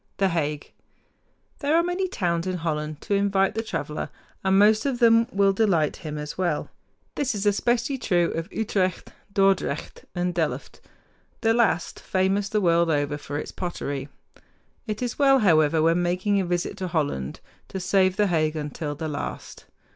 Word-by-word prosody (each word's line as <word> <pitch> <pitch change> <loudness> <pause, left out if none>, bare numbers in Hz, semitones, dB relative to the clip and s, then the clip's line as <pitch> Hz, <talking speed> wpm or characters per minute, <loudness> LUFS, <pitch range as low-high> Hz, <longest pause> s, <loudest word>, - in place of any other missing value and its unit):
THE 195 -1 +2
HAGUE 150 -4 -2 0.9
There 295 +1 +1
are 340 - +4
many 355 +2 -1
towns 175 - -1
in 185 -1 -1
Holland 155 -2 -3
to - - -2
invite 200 -1 +2
the 225 - -1
traveler, 155 -8 -4 0.3
and 190 0 +3
most 215 +2 +5
of 275 -3 -1
them 230 -1 +5
will 195 0 +3
delight 190 -8 +2
him 150 -1 -6
as 150 +3 -6
well. 175 -5 -1 0.4
This 260 -6 -1
is 200 0 -3
especially 240 +6 +1
true 175 -7 +1
of 165 +4 -4
Utrecht, 190 -4 -1 0.2
Dordrecht, 195 -6 0
and 180 0 -1
Delft, 165 -3 -3 0.6
the 225 -1 +3
last 225 -8 +1
famous 195 +2 0
the 215 0 +1
world 170 -2 +3
over 145 -1 +1
for 145 0 -5
its - - -5
pottery. 145 -6 -4 0.8
It 215 +2 -3
is 245 +2 -3
well, 275 -1 +6
however, 160 - +4
when 165 +2 +3
making 185 +3 +1
a - - -2
visit 175 +3 -2
to 190 -2 -3
Holland, 145 - -2 0.3
to 190 - -5
save 185 0 +2
The 210 - +3
Hague 160 -4 +1
until 150 0 -4
the 160 +2 -4
last. 145 -2 -6
185 Hz, 170 wpm, -25 LUFS, 160-210 Hz, 0.9 s, well